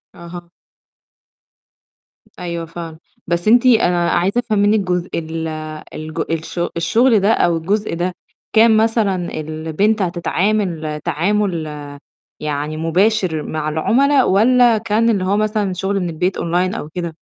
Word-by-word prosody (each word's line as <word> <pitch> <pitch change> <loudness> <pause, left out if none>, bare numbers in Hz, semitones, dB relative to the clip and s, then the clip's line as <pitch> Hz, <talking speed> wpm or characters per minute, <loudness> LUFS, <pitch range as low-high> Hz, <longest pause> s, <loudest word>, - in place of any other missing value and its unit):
أها. 170 0 -10 1.9
أيوه 170 -1 -4
فاهمة، 165 -1 -8 0.3
بس 170 +2 -1
أنتِ 240 +3 +5
أنا 180 -8 +3
عايزة 190 +7 +1
أفهم 215 -4 -1
منِّك 205 +2 +3
جزء 180 -2 -2
ال 160 0 -4 0.5
الج 155 0 -7
الش 165 +2 -4 0.2
الشُغل 225 +7 +3
ده 200 +3 +2
أو 175 -6 +2
الجزء 205 +6 -1
ده، 180 +1 -2 0.4
كان 220 0 +5
مثلًا 210 -7 0
البنت 160 +8 -1
هتتعامل 175 -3 -1
تعامُل 175 +1 -1 0.7
يعني 150 +1 -3
مباشر 175 0 +1
مع 155 -1 -3
العُملا 260 - +2
والّا 235 +3 +4
كان 225 +1 +1
اللي 200 -5 +1
هو 200 +2 +1
مثلًا 210 -2 0
شُغل 195 +2 -1
من 180 - -2
البيت 180 +4 -1
أونلاين 180 +3 0
أو 150 - -6
كده؟ 170 -1 -5
180 Hz, 130 wpm, -18 LUFS, 165-215 Hz, 1.9 s, أنتِ